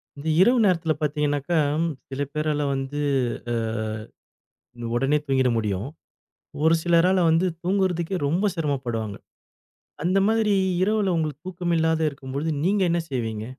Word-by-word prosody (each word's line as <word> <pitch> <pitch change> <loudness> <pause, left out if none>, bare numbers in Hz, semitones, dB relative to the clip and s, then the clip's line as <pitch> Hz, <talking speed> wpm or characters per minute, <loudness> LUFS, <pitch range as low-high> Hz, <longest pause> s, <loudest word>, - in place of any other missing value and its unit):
இந்த 145 +3 -8
இரவு 245 +6 +5
நேரத்துல 165 -4 +2
பாத்தீங்கன்னாக்கா, 150 +2 0 0.5
சில 135 +1 -4
பேறால 150 -1 0
வந்து 135 +2 -3 0.5
அ - - 0 1.4
உடனே 135 +4 +2
தூங்கிற 130 -2 +2
முடியும். 105 0 -2 0.8
ஒரு 160 +1 +5
சிலரால 175 +2 +3
வந்து 165 +3 +3 0.2
தூங்குறதுக்கே 185 -1 0
ரொம்ப 170 +8 0
சிரமம் 145 -6 -2
படுவாங்க. 110 -4 -3 0.9
அந்த 180 +4 +2
மாதிரி 220 -2 +2 0.3
இரவுல 205 -2 +2
உங்களுக்குத் 155 -1 -3
தூக்கம் 175 -1 -2
இல்லாத 160 0 +1
இருக்கும்போது 140 +2 -5 0.2
நீங்க 200 +2 +2
என்ன 170 - +2
செய்வீங்க? 110 -5 -3
160 Hz, 125 wpm, -24 LUFS, 135-180 Hz, 1.4 s, இரவு